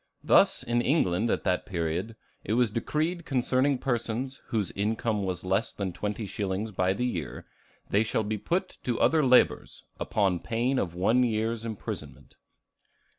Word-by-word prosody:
Thus - - +4
in 120 0 +1
England 115 - +2
at - - 0
that 90 - 0
period 90 +4 -2 0.3
it 105 - -2
was 120 -2 +3
decreed 155 +10 -1
concerning 130 0 +1
persons 125 +1 -2
whose 110 -6 -1
income 105 +1 -1
was 90 -2 -3
less 95 +4 +1
than 95 -3 -3
twenty 105 +3 -3
shillings 100 +2 -3
by 95 -1 +1
the 125 +6 -1
year, 85 -11 -4 0.5
"They 100 - +4
shall 110 0 0
be 105 0 -3
put 180 - -2
to 120 -2 -1
other 160 -1 +4
labors, 125 -1 +3 0.2
upon 95 -4 +1
pain 120 +7 0
of 85 -3 -2
one 110 +8 +3
year's 115 0 -1
imprisonment." 110 -2 -7
110 Hz, 155 wpm, -28 LUFS, 100-125 Hz, 0.5 s, Thus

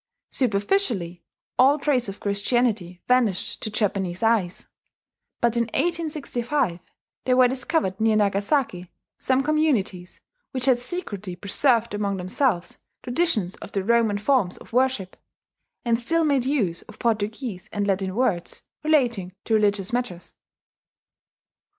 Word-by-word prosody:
Superficially, 205 - 0 0.4
all 275 +3 +6
trace 270 -6 0
of 195 - -8
Christianity 200 -3 0
vanished 240 -7 +1
to - - -2
Japanese 195 -3 -1
eyes; 220 -6 +1 0.8
but 235 -1 +2
in 235 0 +2
1865 285 - -1 0.5
there 255 -1 +3
were 255 -1 +7
discovered 250 - -1
near 220 -1 +3
Nagasaki 200 - 0 0.3
some 260 +1 +1
communities 270 - 0 0.3
which 255 -1 0
had 255 -3 +4
secretly 230 - -4
preserved 230 - +1
among 200 -1 -1
themselves 185 0 0 0.2
traditions 245 - +1
of - - -11
the 195 - -1
Roman 225 -1 +2
forms 205 -4 +1
of - - -15
worship, 250 -7 0 0.7
and 230 -1 +2
still 330 +7 +1
made 280 -5 +2
use 220 - 0
of 215 - -15
Portuguese 220 -3 -2
and 205 -1 -1
Latin 190 -1 -1
words 205 -8 -1 0.2
relating 240 - +1
to 225 - -1
religious 205 -1 +1
matters. 240 -8 -3
225 Hz, 125 wpm, -24 LUFS, 195-260 Hz, 0.8 s, were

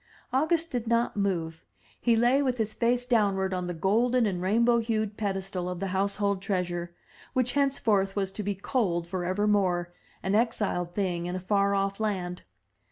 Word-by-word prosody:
August 320 +4 +1
did 240 -2 -2
not 235 +1 +1
move; 170 -5 -1 0.4
he 235 -1 +3
lay 240 +5 +4
with 255 -3 0
his 220 -2 -1
face 245 +1 +1
downward 200 -6 +2
on 180 -1 -2
the 175 - -3
golden 230 +8 +2
and 185 -4 -1
rainbow 235 +5 +3
hued 220 -2 -1
pedestal 195 -3 -2
of 180 -1 -4
the 195 0 -2
household 200 0 0
treasure, 175 -3 -2 0.4
which 255 -2 +1
henceforth 225 -8 +1
was 195 -2 -1
to 210 - -5
be 205 0 -2
cold 185 -5 -1
for 180 0 -3
evermore, 185 -3 +1 0.3
an 190 - 0
exiled 210 -6 0
thing 175 -4 -1
in 180 - -3
a - - -2
far 200 +1 +1
off 195 +1 -1
land. 185 -5 -2
200 Hz, 170 wpm, -28 LUFS, 185-230 Hz, 0.4 s, lay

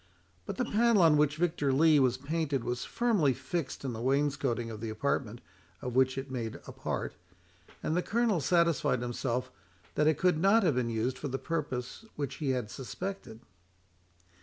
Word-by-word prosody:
But - - -4
the 250 - 0
panel 230 -3 +4
on 160 -2 +6
which 150 0 +3
Victor 160 -4 +1
Lee 155 +2 +5
was 130 -2 +3
painted 145 -2 -1
was 125 +1 -3
firmly 205 - +2
fixed 165 -5 -4
in 130 - -2
the 110 - -5
wainscoting 135 -3 0
of 110 -1 -8
the 115 - -3
apartment, 115 0 -2 0.4
of 125 +3 -5
which 130 0 +3
it 135 0 -5
made 115 -4 -3
a - - -8
part, - - -4 0.7
and 155 - 0
the 180 - +2
Colonel 225 -2 +1
satisfied 170 -6 +2
himself 125 +1 -2 0.4
that 150 - +2
it 155 - +3
could 180 -4 +2
not 200 +5 +5
have 165 -5 +3
been 125 -2 0
used 115 +3 -1
for 145 - -3
the 135 0 -2
purpose 140 - -4
which 140 -3 -4
he 145 -4 -2
had 125 -5 -1
suspected. 180 - -6
140 Hz, 180 wpm, -30 LUFS, 125-165 Hz, 0.7 s, on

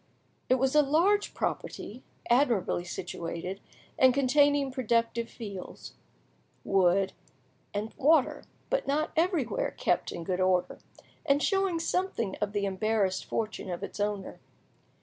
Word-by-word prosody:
It 255 - +5
was 260 +1 +1
a 300 - +7
large 345 +9 +2
property, 240 +5 -4 0.3
admirably 235 -9 +2
situated, 175 +2 -5 0.4
and 260 -1 +6
containing 280 0 +3
productive 235 -2 0
fields, 200 -5 -8 0.7
wood, 190 0 +2 0.6
and 210 +2 -4
water; 300 -1 +3 0.3
but - - 0
not 300 +3 0
everywhere 345 - 0
kept - - 0
in 170 - -6
good 180 +1 -2
order, 180 -1 +1 0.4
and 280 +1 +2
showing 390 -3 +1
something 330 - -1
of 210 -1 -1
the 205 -1 0
embarrassed 195 -1 0
fortune 220 -3 -3
of 175 +2 -4
its 200 - -7
owner. 205 -2 -2
230 Hz, 125 wpm, -29 LUFS, 195-290 Hz, 0.7 s, a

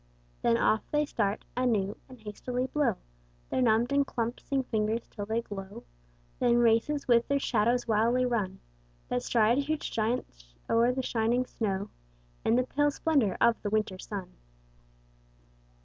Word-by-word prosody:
Then 115 - +3
off 215 - +2
they 300 0 +1
start 205 -6 -1
anew 220 -6 +1
and 255 -1 -13
hasty 215 +3 -8
blow 265 -5 +1 0.6
Their 260 - +1
numbed 235 +1 +3
and 280 0 +4
clumpsing 250 +2 -2
fingers 220 0 -1
till 205 -1 -7
they 225 +2 -1
glow; 195 -2 -8 0.6
Then 240 -1 +3
races 240 +5 +2
with 235 -1 +4
their 280 - +2
shadows 240 -2 +1
wildly 230 +3 +2
run 205 -6 -2 0.5
That 125 - 0
stride 230 - +3
huge 300 +2 -2
giants 135 - -3
o'er 235 +2 +3
the 260 +1 -2
shining 240 +2 +1
snow 200 -5 -3 0.5
In 225 - +3
the 255 - +3
pale 290 +3 +1
splendour 280 - +1
of 235 -1 +3
the 205 - -2
winter 210 -3 -1
sun. 195 -3 -6
230 Hz, 150 wpm, -29 LUFS, 210-255 Hz, 0.6 s, and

